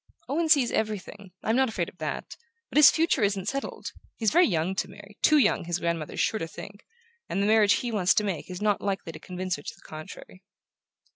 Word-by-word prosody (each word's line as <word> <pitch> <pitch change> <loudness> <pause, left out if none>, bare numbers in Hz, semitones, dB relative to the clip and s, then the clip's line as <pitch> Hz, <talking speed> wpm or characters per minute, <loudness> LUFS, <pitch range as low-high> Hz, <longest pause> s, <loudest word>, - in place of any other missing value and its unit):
"Owen 320 +4 0
sees 280 -6 +4
everything: 205 -2 -3
I'm 220 - +1
not 265 -1 +3
afraid 175 -6 -2
of 180 - -14
that. 155 -1 -5 0.4
But - - -1
his 300 - +10
future 330 -5 +1
isn't 200 -2 0
settled. 275 +4 -4 0.3
He's 220 -3 +1
very 355 +1 +5
young 170 -1 0
to - - -1
marry 200 +1 -14
too 305 - +5
young, 210 - +2
his 175 0 -1
grandmother 170 -3 -2
is - - -5
sure 220 - +1
to 165 - -3
think 200 +4 -11 0.4
and - - -1
the 200 - +2
marriage 215 -1 +5
he 245 - -2
wants 195 -4 +2
to 210 - +2
make 190 -5 -3
is 180 +2 -6
not 210 -2 +1
likely 195 -4 -3
to 155 - -11
convince 185 +1 -4
her - - -10
to - - -8
the - - -23
contrary." 155 +4 -10
200 Hz, 225 wpm, -27 LUFS, 180-225 Hz, 0.4 s, his